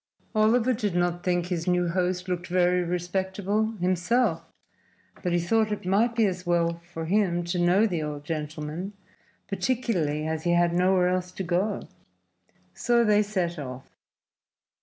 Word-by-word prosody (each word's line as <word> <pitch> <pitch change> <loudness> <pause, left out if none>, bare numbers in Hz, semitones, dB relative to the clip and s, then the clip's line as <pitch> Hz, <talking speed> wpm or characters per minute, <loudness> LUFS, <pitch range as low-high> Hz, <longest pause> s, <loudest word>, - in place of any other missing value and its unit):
Oliver 225 +3 +3
did 210 -5 -2
not 175 0 0
think 175 -1 0
his 175 -1 -3
new 180 -1 +2
host 180 +1 -1
looked 180 0 -3
very 180 0 +2
respectable 190 +5 -1
himself, 185 +5 +1 0.8
but 180 - -1
he 175 - +2
thought 215 +5 +1
it 210 - -4
might 220 +6 +2
be 225 -2 +3
as 185 -2 -2
well 170 -1 0
for 165 -1 -5
him 175 -1 +1
to 175 +1 -2
know 180 +5 +4
the 175 -7 -1
old 150 -1 -5
gentleman, 155 +4 -4 0.5
particularly 195 - -1
as 160 0 -2
he 175 - +2
had 175 0 +3
nowhere 180 0 +3
else 180 0 -1
to 190 - -4
go. 185 +4 -1 0.9
So 240 -1 +2
they 210 -2 +4
set 185 -5 -2
off. 130 -2 -8
180 Hz, 155 wpm, -26 LUFS, 175-205 Hz, 0.9 s, know